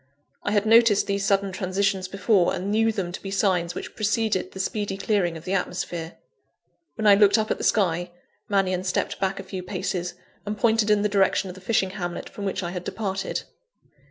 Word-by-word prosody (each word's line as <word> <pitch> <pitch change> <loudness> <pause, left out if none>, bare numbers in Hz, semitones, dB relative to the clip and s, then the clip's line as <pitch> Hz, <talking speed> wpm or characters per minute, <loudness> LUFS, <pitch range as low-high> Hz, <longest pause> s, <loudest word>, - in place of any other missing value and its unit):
I - - -2
had 205 0 +2
noticed 225 -2 +5
these 200 0 -1
sudden 195 -1 +2
transitions 190 0 -1
before, 195 -1 +2
and 195 +3 -3
knew 225 +1 +3
them 195 -5 -3
to 175 - -7
be 195 - -6
the 195 - -3
signs 180 -4 +1
which - - -7
preceded 215 -2 0
the 190 - -9
speedy 205 0 -2
clearing 195 -5 0
of 160 - -12
the 185 - -2
atmosphere. 175 -3 -3 0.8
When 220 - -3
I 205 - +8
looked 205 +1 +5
up 215 0 0
at - - -1
the - - -4
sky, 175 -4 +1 0.4
Mannion 190 -2 +1
stepped 185 -1 -1
back 195 0 -1
a - - -6
few 190 -2 -6
paces, 180 -1 -3 0.3
and 210 +1 -4
pointed 220 0 +2
in 210 -1 +3
the - - +3
direction 195 -1 +2
of - - -10
the 185 - -13
fishing 195 -2 +1
hamlet 175 -3 -5
from 205 - -6
which 195 0 -2
I 175 - -3
had 180 -1 -5
departed. 195 -1 -3
195 Hz, 210 wpm, -25 LUFS, 185-210 Hz, 0.8 s, I